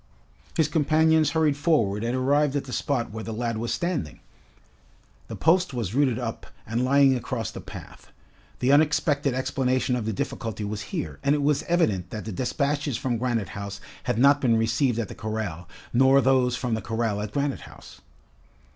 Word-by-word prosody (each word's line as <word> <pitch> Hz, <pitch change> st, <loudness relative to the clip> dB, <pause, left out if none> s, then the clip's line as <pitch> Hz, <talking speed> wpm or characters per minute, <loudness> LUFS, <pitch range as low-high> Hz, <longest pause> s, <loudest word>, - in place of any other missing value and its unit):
His 160 Hz, -, +3 dB
companions 155 Hz, 0 st, +3 dB
hurried 155 Hz, -2 st, +2 dB
forward 125 Hz, -, +1 dB
and 120 Hz, +2 st, -1 dB
arrived 140 Hz, +2 st, +2 dB
at 145 Hz, -, 0 dB
the 130 Hz, -, -8 dB
spot 130 Hz, -7 st, -1 dB
where 110 Hz, +1 st, -6 dB
the 115 Hz, -, -5 dB
lad 115 Hz, 0 st, -2 dB
was 115 Hz, +1 st, -3 dB
standing. 170 Hz, -, -2 dB, 1.1 s
The -, -, -6 dB
post 170 Hz, -4 st, +2 dB
was 110 Hz, -5 st, -3 dB
rooted 130 Hz, -3 st, +2 dB
up 115 Hz, -3 st, -5 dB, 0.2 s
and 115 Hz, +3 st, -1 dB
lying 135 Hz, 0 st, +5 dB
across 120 Hz, -3 st, -3 dB
the -, -, -8 dB
path. -, -, -11 dB, 0.5 s
The 125 Hz, +2 st, +3 dB
unexpected 145 Hz, -2 st, +2 dB
explanation 130 Hz, -1 st, 0 dB
of 115 Hz, -3 st, -3 dB
the -, -, 0 dB
difficulty 110 Hz, +1 st, -4 dB
was 105 Hz, 0 st, -4 dB
here, 75 Hz, -4 st, -4 dB
and 140 Hz, +1 st, +2 dB
it 145 Hz, -, -1 dB
was 145 Hz, -1 st, +2 dB
evident 105 Hz, -, +1 dB
that 110 Hz, +1 st, -6 dB
the 110 Hz, -, -4 dB
despatches 140 Hz, -, -1 dB
from 120 Hz, -3 st, -2 dB
Granite 120 Hz, -5 st, -1 dB
House 100 Hz, -1 st, -6 dB, 0.3 s
had 125 Hz, -3 st, 0 dB
not 140 Hz, +3 st, +5 dB
been 115 Hz, -3 st, +3 dB
received 115 Hz, +2 st, +1 dB
at 115 Hz, -3 st, -1 dB
the -, -, -8 dB
corral, 105 Hz, -6 st, -5 dB, 0.2 s
nor 135 Hz, +3 st, +5 dB
those 130 Hz, -2 st, +3 dB
from 125 Hz, -2 st, -2 dB
the 110 Hz, -, -1 dB
corral 110 Hz, -2 st, -1 dB
at 105 Hz, -1 st, -5 dB
Granite 140 Hz, +1 st, -1 dB
House. -, -, -15 dB
125 Hz, 180 wpm, -25 LUFS, 110-145 Hz, 1.1 s, lying